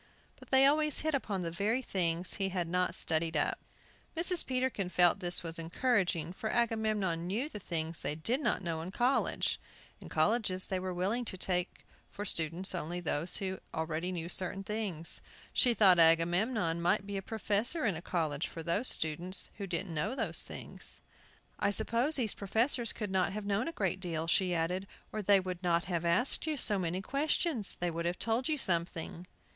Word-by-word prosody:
But - - -15
they 265 0 +6
always 300 +1 +3
hit 315 0 -1
upon 205 -9 -1
the 165 - -3
very 210 +9 0
things 175 -4 0
he 195 -1 -1
had 180 -2 -2
not 180 0 0
studied 160 -1 +1
up. - - 0 0.6
Mrs. 350 +1 +5
Peterkin 255 -7 -1
felt 180 +1 +4
this 175 -2 +4
was 165 0 -5
encouraging, 175 -2 0
for 220 +2 -4
Agamemnon 215 -8 0
knew 225 +10 -1
the 210 - -8
things 165 -3 -3
they 145 +2 -2
did 230 - 0
not 200 - 0
know 165 -2 -2
in 170 - -6
colleges. 245 +7 +1 0.4
In - - -11
colleges 185 +2 +1
they 190 - -2
were 185 0 -3
willing 195 +7 -1
to 190 - -4
take 180 -1 -2 0.2
for 205 - -6
students 170 +1 0
only 175 0 -3
those 165 0 0
who 190 -1 -3 0.2
already 160 +2 -2
knew 170 -2 -4
certain 185 +2 -2
things. 195 -6 -1 0.3
She 245 -3 +5
thought 190 -5 +6
Agamemnon 170 +2 +3
might 190 +4 +2
be 200 0 -5
a - - -3
professor 225 - 0
in 200 -6 +1
a 160 - -6
college 160 -4 -1
for 165 - -7
those 185 +9 0
students 175 +4 0
who 200 - -4
didn't 175 0 -3
know 195 +11 -1
those - - +1
things. - - -6 0.6
"I 200 - +2
suppose 235 +9 +1
these 235 -6 +2
professors 230 +4 0
could 210 -3 -5
not 190 0 +1
have 210 0 -5
known 205 +5 0
a - - -2
great 190 - -1
deal," 165 -3 -3
she 180 +1 +2
added, 180 +4 -1 0.2
"or 215 - -3
they 200 0 +5
would 185 -1 -5
not 170 -1 +2
have 170 -2 -2
asked 245 - +2
you 310 -2 -1
so 205 -5 +2
many 180 +1 -2
questions; 280 - +1
they 175 -1 -1
would 170 +1 -4
have 175 +1 -2
told 230 +5 0
you 305 - +2
something." 170 - -1
185 Hz, 190 wpm, -32 LUFS, 170-220 Hz, 0.6 s, they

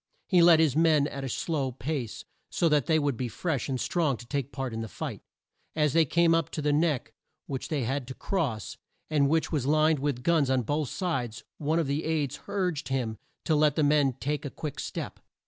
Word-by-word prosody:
He 180 -3 +5
led 170 -1 +7
his 155 -5 +3
men 155 -3 +4
at 140 -1 -5
a 135 - -3
slow 140 0 -1
pace, 125 -1 -4 0.2
so 170 - +1
that 150 -3 +2
they 160 - +4
would 145 -4 +1
be 125 +2 -2
fresh 145 +3 -2
and 130 -2 -1
strong 155 -6 0
to 120 - -11
take 140 +2 -3
part 135 -4 -4
in 110 - -3
the 115 - -4
fight. - - -6 0.5
As 150 -3 +2
they 165 -1 +5
came 170 +3 +3
up 165 -3 +1
to 155 - -2
the 145 0 +2
Neck, 150 -3 +1 0.3
which 135 -2 -4
they 145 -5 -1
had 130 +2 -2
to 130 - -7
cross, 135 - -2 0.3
and 140 -2 +3
which 160 +1 +1
was 140 -5 -1
lined 155 0 +3
with 135 -3 -2
guns 160 -4 +3
on 130 -2 +2
both 145 +2 -1
sides, 125 - -3 0.2
one 155 +2 +1
of 165 - +2
the 140 +3 -1
aides 155 -4 -1
urged 185 -7 -1
him 120 -5 -2 0.3
to 160 - +2
let 150 -1 +3
the 155 - +2
men 145 -2 +3
take 145 +4 -3
a 145 - -4
quick 150 +1 -6
step. - - -5
145 Hz, 220 wpm, -28 LUFS, 130-160 Hz, 0.5 s, led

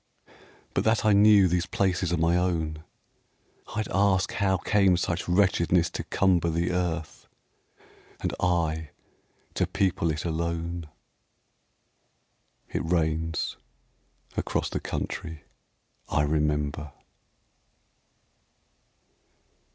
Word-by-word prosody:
But - - +1
that 110 0 +2
I 105 - +5
knew 100 -1 +6
these 90 0 0
places 95 -2 0
are 90 - +1
my 85 +2 +2
own, 80 -4 -1 0.9
I'd 110 -1 -1
ask 95 -1 +2
how 95 -2 +1
came 95 -1 +3
such 90 -1 -2
wretchedness 90 -2 +3
to - - -4
cumber 90 -3 +2
The 85 +2 0
earth, 85 -3 -3 0.9
and - - -2
I 80 -3 0 0.6
to - - 0
people 90 -3 0
it 75 +1 -3
alone. 85 0 -3 1.9
It - - -1
rains 80 -1 -1 0.8
across - - -1
the - - -2
country 80 -3 -5 0.7
I 75 - +2
remember. 75 -1 -1
85 Hz, 95 wpm, -27 LUFS, 80-95 Hz, 1.9 s, knew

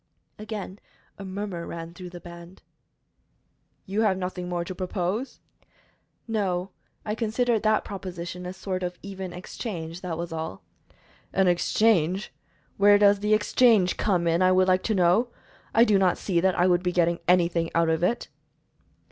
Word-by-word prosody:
Again 210 -2 -6 0.4
a - - -6
murmur 190 -3 -5
ran 165 0 -7
through 180 0 -9
the 175 0 -10
band. 170 +1 -12 1.2
"You 200 +3 -1
have 200 -4 +2
nothing 180 -1 -4
more 175 -1 -2
to 185 - -5
propose?" 185 +6 -3 0.9
"No; 195 -4 -1 0.3
I 210 - -2
considered 230 0 0
that 215 0 +2
proposition 180 -2 -6
a - - -4
sort 185 -1 -4
of 180 -1 -4
even 190 -2 -6
exchange; 175 -2 -6
that 175 -3 -4
was 170 0 -5
all." 160 -11 -5 0.7
"An 190 0 +2
exchange? 185 0 +2 0.4
Where 205 +1 +6
does 205 0 +5
the 210 +1 +3
exchange 215 -3 +3
come 180 -5 +1
in, 170 +1 +2
I 185 0 +5
would 185 0 +4
like 185 0 +3
to 220 - +1
know? 185 +6 +3 0.4
I 230 - +5
do 210 -4 +4
not 185 -2 +2
see 180 -4 0
that 185 +1 +1
I 175 - +4
would 175 -1 +3
be 180 -1 0
getting 170 -1 +1
anything 170 -2 +2
out 165 -1 +3
of 160 0 +1
it." 205 +7 0
185 Hz, 165 wpm, -26 LUFS, 175-205 Hz, 1.2 s, Where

